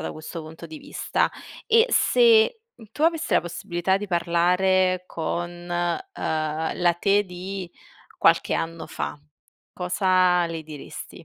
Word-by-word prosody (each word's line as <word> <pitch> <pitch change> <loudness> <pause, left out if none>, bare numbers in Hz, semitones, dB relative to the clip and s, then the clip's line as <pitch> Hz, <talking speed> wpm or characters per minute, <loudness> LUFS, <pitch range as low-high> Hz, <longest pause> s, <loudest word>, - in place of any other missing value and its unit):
da 160 - -4
questo 155 +2 -7
punto 160 +2 -10
di 155 -1 -9
vista. - - -1 0.4
E 455 +1 +5
se 465 -1 +4 0.3
tu 295 - -5
avessi 330 0 +1
la - - +5
possibilità 175 +2 -1
di 205 - -5
parlare 180 +1 +2
con, 170 +1 -3 0.2
ehm, 170 - -2
la 175 -1 +4
te 205 +1 +3
di 185 0 -7 0.5
qualche - - +3
anno 165 -1 -3
fa. 145 - -5 0.5
Cosa 180 -1 +2
le 165 -1 -5
diresti? 150 -2 -10
180 Hz, 130 wpm, -24 LUFS, 165-195 Hz, 0.5 s, E